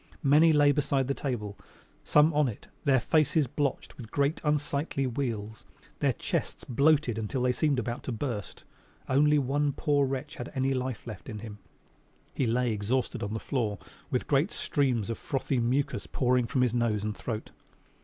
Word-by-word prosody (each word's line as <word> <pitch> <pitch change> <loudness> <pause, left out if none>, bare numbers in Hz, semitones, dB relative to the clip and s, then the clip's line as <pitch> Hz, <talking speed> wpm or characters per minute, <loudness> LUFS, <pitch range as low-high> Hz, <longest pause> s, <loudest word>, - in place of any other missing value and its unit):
Many 150 +4 +6
lay 145 -1 +5
beside 140 -2 +1
the 140 - +1
table, 105 -8 -4 0.4
some 150 +2 +4
on 150 -1 +3
it, 115 - -7 0.2
their 135 -2 +5
faces 155 +3 +2
blotched 140 +1 -3
with 115 -4 -9
great, 140 +5 0
unsightly 145 -1 0
wheals, 115 -4 -3 0.4
their - - +2
chests - - -3
bloated 140 -2 +2
until 110 +4 -2
they 125 - +3
seemed 140 +2 +1
about 120 0 -3
to - - -2
burst. 115 -3 -4 0.4
Only 150 +3 +4
one 140 +1 +1
poor 145 -1 +2
wretch 140 +4 -4
had - - -6
any 135 +1 +1
life 130 -3 -3
left 105 -7 -8
in 105 - -5
him 105 -1 -8 0.7
he 130 - 0
lay 120 +1 +1
exhausted 110 +5 -1
on 100 +2 -3
the - - -2
floor 110 -7 -1 0.3
with - - -1
great - - +2
streams 125 -6 0
of 115 - -5
frothy 135 -1 -1
mucous 130 +4 0
pouring 125 -2 +1
from 125 +2 +1
his 120 -2 +1
nose 115 -4 +1
and 105 0 -2
throat. 110 -3 -5
130 Hz, 175 wpm, -29 LUFS, 115-145 Hz, 0.7 s, Many